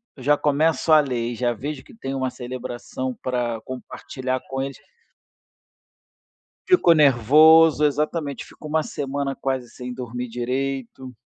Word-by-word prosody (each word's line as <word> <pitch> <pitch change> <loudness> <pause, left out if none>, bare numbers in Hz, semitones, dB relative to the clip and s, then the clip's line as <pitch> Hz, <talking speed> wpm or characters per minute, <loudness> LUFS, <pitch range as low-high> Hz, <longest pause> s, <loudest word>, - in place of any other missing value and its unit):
eu 130 - -12
já 145 +2 +4
começo 150 +2 +1
a 155 - +8
ler 125 -5 -1
e - - -7
já 120 0 0
vejo 140 +4 -6
que - - -17
tem 135 -10 -5
uma 130 -1 -1
celebração 125 0 -6
pra 120 -3 -2
compartilhar 130 0 -5
com 135 0 -4
eles. 135 0 -5 1.9
Fico 355 - +5
nervoso 150 +3 +6
exatamente, 150 0 -1
fico 155 - -12
1 155 +1 +1
semana 140 -1 -3
quase 130 -3 -3
sem 125 -1 -8
dormir 125 0 -5
direito. 130 +1 -4
135 Hz, 140 wpm, -23 LUFS, 125-150 Hz, 1.9 s, a